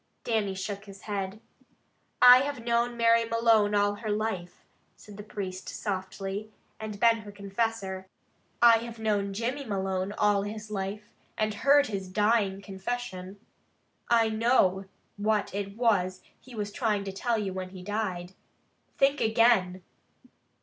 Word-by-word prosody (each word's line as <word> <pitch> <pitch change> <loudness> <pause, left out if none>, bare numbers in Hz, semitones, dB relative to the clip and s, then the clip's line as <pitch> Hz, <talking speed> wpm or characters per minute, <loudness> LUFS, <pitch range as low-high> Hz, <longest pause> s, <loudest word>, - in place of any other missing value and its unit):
Dannie 210 -4 0
shook 200 +2 -5
his 195 -1 -12
head. 200 -1 -4 0.8
"I 250 0 +10
have 275 -3 -3
known 235 0 +1
Mary 230 0 +4
Malone 225 -2 +3
all 205 0 +3
her 215 0 -5
life," 210 -4 -3 0.3
said 210 - -14
the 205 - -8
priest 190 -3 -6
softly, 195 0 -4 0.3
"and 215 -2 -6
been 230 0 +5
her 210 -2 -10
confessor. 200 -1 -3 0.6
I 230 -1 +8
have 235 0 -8
known 205 -3 0
Jimmy 240 +8 -3
Malone 190 -3 -2
all 205 -1 +2
his 215 +1 -6
life, 210 +2 -5 0.2
and 215 0 0
heard 280 +7 +4
his 195 -5 -5
dying 205 -1 +1
confession. 195 -1 -5 0.7
I 230 -1 +4
know 220 -4 +2 0.3
what 210 -1 0
it 200 +1 -4
was 190 -6 +1 0.2
he 250 -1 -13
was 205 -1 -3
trying 210 -3 0
to 195 - -5
tell 230 +4 -1
you 200 -3 -2
when 185 0 -5
he 185 -1 -10
died. 190 -3 -3 0.6
Think 275 +1 +3
again!" 220 -5 +3
210 Hz, 145 wpm, -28 LUFS, 195-230 Hz, 0.8 s, I